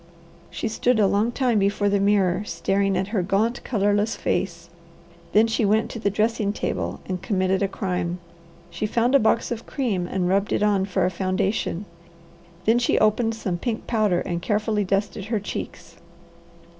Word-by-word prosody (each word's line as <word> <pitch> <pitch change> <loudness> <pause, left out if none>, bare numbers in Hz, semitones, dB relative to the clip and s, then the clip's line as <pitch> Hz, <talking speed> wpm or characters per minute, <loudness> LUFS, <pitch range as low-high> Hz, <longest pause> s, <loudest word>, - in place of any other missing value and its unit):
She - - -3
stood 230 +2 +1
a 210 - +5
long 205 +4 +2
time 240 -3 +1
before 200 +1 +1
the 200 0 +2
mirror, 195 -2 +2
staring 195 -2 0
at 190 +2 -1
her 210 -3 0
gaunt, 205 +6 0
colourless 205 -1 +1
face; 170 -3 -2 0.6
then 215 +2 +5
she 225 0 0
went 215 +2 +2
to 230 - -6
the 205 - +1
dressing 215 0 0
table - - -3
and 185 -2 -3
committed 190 -1 0
a 200 - +2
crime. 180 -3 -2 0.5
She 175 +5 -2
found 235 +4 +1
a 275 - +7
box 230 +1 +1
of 235 -1 -5
cream 210 -11 -1
and 180 -1 -1
rubbed 195 +2 +1
it - - +1
on 200 -2 +2
for 190 -1 0
a 185 - 0
foundation. 190 +1 -1 0.8
Then 230 +2 +4
she 240 - +2
opened 220 +1 +2
some 185 -6 -3
pink 230 +1 -3
powder, 210 -6 +1
and 175 -1 -3
carefully 210 +1 0
dusted 195 +1 -1
her 220 0 -1
cheeks. 170 -4 -7
205 Hz, 175 wpm, -24 LUFS, 190-220 Hz, 0.8 s, a